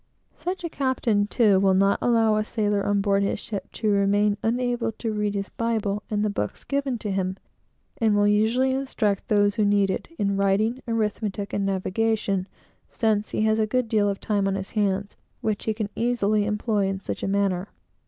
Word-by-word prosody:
Such 365 Hz, +1 st, -4 dB
a -, -, -1 dB
captain, 245 Hz, -8 st, 0 dB
too, 210 Hz, -4 st, +3 dB
will 190 Hz, -1 st, +3 dB
not 195 Hz, +1 st, +3 dB
allow 225 Hz, -2 st, +3 dB
a 215 Hz, -, +1 dB
sailor 210 Hz, -2 st, 0 dB
on 205 Hz, 0 st, +1 dB
board 200 Hz, 0 st, +2 dB
his 200 Hz, -, -1 dB
ship 205 Hz, -3 st, -6 dB
to 215 Hz, -2 st, 0 dB
remain 205 Hz, +1 st, +3 dB
unable 240 Hz, 0 st, 0 dB
to 225 Hz, 0 st, -4 dB
read 210 Hz, -1 st, -1 dB
his 195 Hz, -1 st, -3 dB
Bible 215 Hz, -3 st, -1 dB
and 210 Hz, -1 st, 0 dB
the -, -, +1 dB
books 105 Hz, -, -4 dB
given 275 Hz, -3 st, -1 dB
to 210 Hz, -2 st, -4 dB
him; 190 Hz, 0 st, -1 dB, 0.6 s
and 220 Hz, -2 st, +3 dB
will 205 Hz, 0 st, +3 dB
usually 225 Hz, +6 st, +3 dB
instruct 260 Hz, -7 st, -1 dB
those 205 Hz, -1 st, +3 dB
who 215 Hz, -, +1 dB
need 200 Hz, -1 st, +3 dB
it, -, -, -4 dB
in 200 Hz, -1 st, 0 dB
writing, 210 Hz, +6 st, +1 dB
arithmetic, 210 Hz, -3 st, -2 dB
and 200 Hz, -1 st, 0 dB
navigation; 195 Hz, 0 st, 0 dB, 0.4 s
since 215 Hz, -2 st, 0 dB
he -, -, -1 dB
has 220 Hz, 0 st, +2 dB
a 215 Hz, -, +2 dB
good 255 Hz, +2 st, 0 dB
deal 210 Hz, -2 st, +2 dB
of 195 Hz, -, -3 dB
time 205 Hz, -2 st, 0 dB
on 195 Hz, -, 0 dB
his 195 Hz, 0 st, -5 dB
hands, 200 Hz, -2 st, -1 dB, 0.2 s
which 215 Hz, -2 st, -2 dB
he 220 Hz, -, +1 dB
can 215 Hz, -1 st, -2 dB
easily 215 Hz, -3 st, +1 dB
employ 210 Hz, -1 st, 0 dB
in 195 Hz, 0 st, -2 dB
such -, -, -5 dB
a -, -, -2 dB
manner. 195 Hz, -1 st, 0 dB
210 Hz, 195 wpm, -25 LUFS, 200-225 Hz, 0.6 s, too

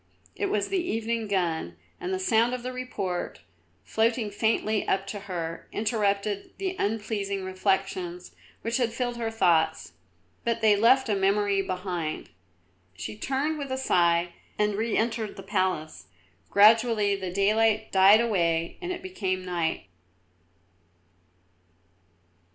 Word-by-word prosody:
It 400 Hz, -, -1 dB
was 395 Hz, -, -1 dB
the 385 Hz, -2 st, +1 dB
evening 230 Hz, -6 st, -2 dB
gun, 165 Hz, -, -1 dB, 0.2 s
and 180 Hz, -, -4 dB
the 190 Hz, -, 0 dB
sound 225 Hz, +6 st, +2 dB
of 245 Hz, -, -8 dB
the 255 Hz, 0 st, -4 dB
report, 205 Hz, -8 st, -4 dB, 0.4 s
floating 225 Hz, -, 0 dB
faintly 215 Hz, 0 st, 0 dB
up 195 Hz, 0 st, +1 dB
to 205 Hz, +1 st, -5 dB
her, 170 Hz, -4 st, -5 dB
interrupted 205 Hz, -2 st, -1 dB
the 380 Hz, -1 st, -3 dB
unpleasing 205 Hz, -2 st, -2 dB
reflections 185 Hz, -1 st, -2 dB, 0.3 s
which 230 Hz, +1 st, 0 dB
had 240 Hz, -3 st, 0 dB
filled 245 Hz, 0 st, -2 dB
her 230 Hz, -1 st, -2 dB
thoughts; 160 Hz, -, +1 dB, 0.5 s
but 235 Hz, -1 st, 0 dB
they 215 Hz, -2 st, +5 dB
left 250 Hz, +6 st, +4 dB
a 215 Hz, -, +1 dB
memory 200 Hz, 0 st, +2 dB
behind. 180 Hz, -, -4 dB, 0.6 s
She 105 Hz, +2 st, -6 dB
turned 280 Hz, -, -1 dB
with 280 Hz, -2 st, -5 dB
a 260 Hz, -, -1 dB
sigh 170 Hz, -7 st, +2 dB, 0.2 s
and 210 Hz, 0 st, +1 dB
re 220 Hz, +2 st, -1 dB
entered 220 Hz, -1 st, -1 dB
the -, -, -9 dB
palace; 185 Hz, -6 st, -2 dB, 0.4 s
gradually 215 Hz, 0 st, +5 dB
the 190 Hz, -2 st, -4 dB
daylight 215 Hz, +3 st, +2 dB
died 195 Hz, +3 st, +7 dB
away 170 Hz, -7 st, 0 dB
and 360 Hz, 0 st, -3 dB
it 360 Hz, 0 st, -5 dB
became 190 Hz, -, -3 dB
night. 170 Hz, -3 st, -2 dB
205 Hz, 135 wpm, -27 LUFS, 185-230 Hz, 0.6 s, died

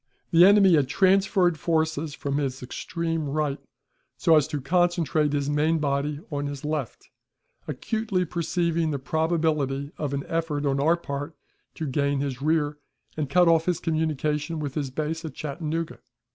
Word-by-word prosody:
The 170 Hz, +1 st, +7 dB
enemy 200 Hz, -2 st, +6 dB
had 145 Hz, -5 st, +4 dB
transferred 190 Hz, 0 st, +3 dB
forces 160 Hz, -2 st, 0 dB
from 140 Hz, 0 st, -2 dB
his 135 Hz, -2 st, -3 dB
extreme 165 Hz, +3 st, -3 dB
right 145 Hz, -1 st, -1 dB, 0.6 s
so 165 Hz, -, +4 dB
as 150 Hz, -3 st, +4 dB
to 150 Hz, -, -3 dB
concentrate 160 Hz, -1 st, +1 dB
his 145 Hz, -1 st, -1 dB
main 150 Hz, +3 st, +2 dB
body 145 Hz, 0 st, -1 dB
on 145 Hz, 0 st, -2 dB
his 140 Hz, 0 st, -6 dB
left, 150 Hz, -4 st, -4 dB, 0.6 s
acutely 215 Hz, -5 st, -1 dB
perceiving 170 Hz, -1 st, 0 dB
the 145 Hz, -, -1 dB
probability 150 Hz, -1 st, 0 dB
of 145 Hz, -2 st, -2 dB
an 140 Hz, -, -3 dB
effort 160 Hz, -3 st, -2 dB
on 140 Hz, -1 st, +1 dB
our 160 Hz, +4 st, +3 dB
part 145 Hz, -1 st, -5 dB, 0.4 s
to 160 Hz, -, -4 dB
gain 140 Hz, 0 st, 0 dB
his 135 Hz, -2 st, -3 dB
rear, 150 Hz, -1 st, +1 dB, 0.4 s
and 150 Hz, -3 st, -2 dB
cut 180 Hz, +3 st, +4 dB
off 165 Hz, -1 st, +4 dB
his 180 Hz, -2 st, 0 dB
communication 155 Hz, -1 st, -1 dB
with 145 Hz, -3 st, -4 dB
his 140 Hz, -2 st, -2 dB
base 155 Hz, +4 st, -3 dB
at 155 Hz, -5 st, -7 dB
Chattanooga. 160 Hz, +2 st, -4 dB
155 Hz, 160 wpm, -25 LUFS, 140-165 Hz, 0.6 s, The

